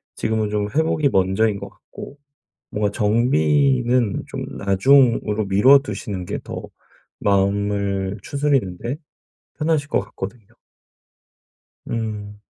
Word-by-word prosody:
지금은 110 -1 -1
좀 105 0 -1
회복이 155 -2 +2
먼저인 100 +1 +1
것 - - -8
같고 140 - -12 0.5
뭔가 105 -1 0
정비는 120 - +2
좀 - - -5
나중으로 110 +1 +3
미뤄 125 +9 +6
두시는 100 -6 -5
게 - - -4
더 - - -7 0.6
마음을 100 0 0
추스리는데 135 -5 -1 0.6
편하실 155 -2 0
것 - - +1
같거든요. 100 +2 -8 1.4
음. 105 -2 -4
105 Hz, 225 characters per minute, -21 LUFS, 100-130 Hz, 1.4 s, 미뤄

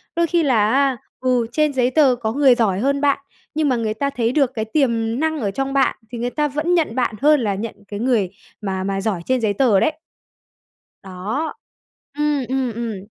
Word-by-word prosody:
Đôi 340 0 +2
khi 340 0 +2
là 225 -7 +3
á, 270 0 +2 0.2
ừ, 250 -3 +1
trên 305 +2 +1
giấy 255 -1 +1
tờ 275 -3 +4
có 230 -2 -3
người 270 -2 +5
giỏi 200 -6 +1
hơn 280 +4 0
bạn, 285 -1 +3 0.4
nhưng 305 -2 +1
mà 255 - +2
người 225 -2 -1
ta 280 +6 -1
thấy 240 -4 -1
được 275 -2 +2
cái 220 -3 -2
tiềm 230 -2 0
năng 315 0 0
ở 205 -6 -1
trong 270 +5 -3
bạn, 270 -2 +2 0.2
thì 240 - -5
người 240 +1 -2
ta 300 +3 0
vẫn 300 +5 -1
nhận 335 -3 +1
bạn, 245 -3 0
hơn 300 +1 +5
là 210 -5 -1
nhận 220 +3 -5
cái 205 - -6
người 230 -6 +1 0.3
mà 190 -2 -2
mà 195 0 -2
giỏi 195 -4 -1
trên 260 -1 +1
giấy 215 -2 +1
tờ 215 -3 +3
đấy. 310 - +2 1.1
Đó. 200 - -4 0.6
Ừm, 295 -2 0
ừm, 260 -2 -1
ừm. 220 -4 -5
250 Hz, 215 wpm, -20 LUFS, 220-280 Hz, 1.1 s, người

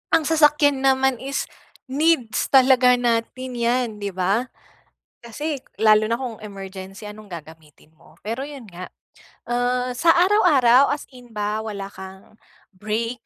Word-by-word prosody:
ang 325 - +2
sasakyan 295 -2 +3
naman 265 -2 +2
is 275 +1 -3 0.5
needs 285 -5 +1
talaga 255 -2 +5
natin 245 +1 -2
'yan, 240 +1 +1
'di 200 -1 -4
ba? 200 +7 0 0.8
Kasi, 295 +6 -4 0.2
lalo 215 0 +5
na 230 +4 -2
kung 235 -4 -5
emergency 195 0 -9
anong 215 +1 -12
gagamitin 160 -2 -12
mo? - - -21
Pero, 230 +5 -4
'yon 280 -6 -10
nga, 180 +1 -10 0.6
uh, 250 +1 -1
sa 330 +6 +4
araw-araw 305 - +4
as 290 - -4
in 245 -1 -15
ba 210 0 -2
wala 205 -3 -6
kang 190 +2 -12 0.4
break 225 +5 -4
240 Hz, 135 wpm, -22 LUFS, 210-265 Hz, 0.8 s, talaga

